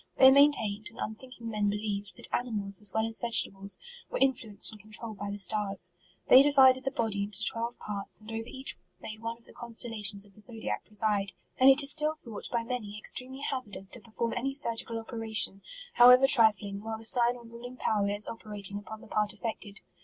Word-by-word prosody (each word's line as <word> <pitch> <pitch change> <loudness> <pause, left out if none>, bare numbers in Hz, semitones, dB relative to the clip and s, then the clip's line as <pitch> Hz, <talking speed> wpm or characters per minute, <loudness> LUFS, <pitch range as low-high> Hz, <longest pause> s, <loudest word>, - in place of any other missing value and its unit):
Thej 265 0 +8
maintained, 220 -8 +2
and 230 - -19
unthinking 235 +2 -8
men 210 -2 -1
believed, 205 -1 -4
that - - -4
animals, 210 -5 -1
as 205 -2 0
well 220 0 -1
as 225 0 -1
vegetables, 200 -4 +1 0.3
were - - -4
in 270 0 +3
fluenced 220 -4 -1
and 215 -1 -14
controlled 215 0 -8
by 205 - -5
the 200 - -5
stars. 200 -2 +1 0.4
They 260 - +8
di 290 - +3
vided 260 -2 +4
the - - +1
body 225 -6 -2
into 200 0 -1
twelve 235 +1 -3
parts, 200 -2 -5
and 215 +1 -12
over 225 0 -5
each 265 +2 -4 0.2
made 215 0 -9
one 230 0 -5
of 230 - -18
the - - -13
constellations 225 -4 -2
of 200 - -22
the 210 - -18
zodiac 225 0 -6
preside; 210 -2 -1 0.3
and 260 +1 +7
it 270 +2 +6
is 280 - +3
still 305 0 +1
thought, 235 -9 -8
by 235 -1 -1
many, 230 -4 -6
ex 210 - +1
tremely 260 +2 -6
hazardous 210 -9 -3
to - - -5
perform 230 +1 -4
any 270 +3 -3
surgical 230 -4 +1
op 225 - -9
eration, 220 -4 +1 0.3
however 250 +2 +7
trifling, 210 -6 +4
while 220 +1 -6
the 225 - -9
sign 240 +1 +7
or 240 - -13
ru 235 0 -12
ling 245 +1 -10
power 205 -4 -1
is 205 +1 -2
operating 205 -3 -1
upon 215 +1 -11
the - - -14
part 210 0 -1
affected. 215 -2 -7
225 Hz, 215 wpm, -28 LUFS, 205-245 Hz, 0.4 s, Thej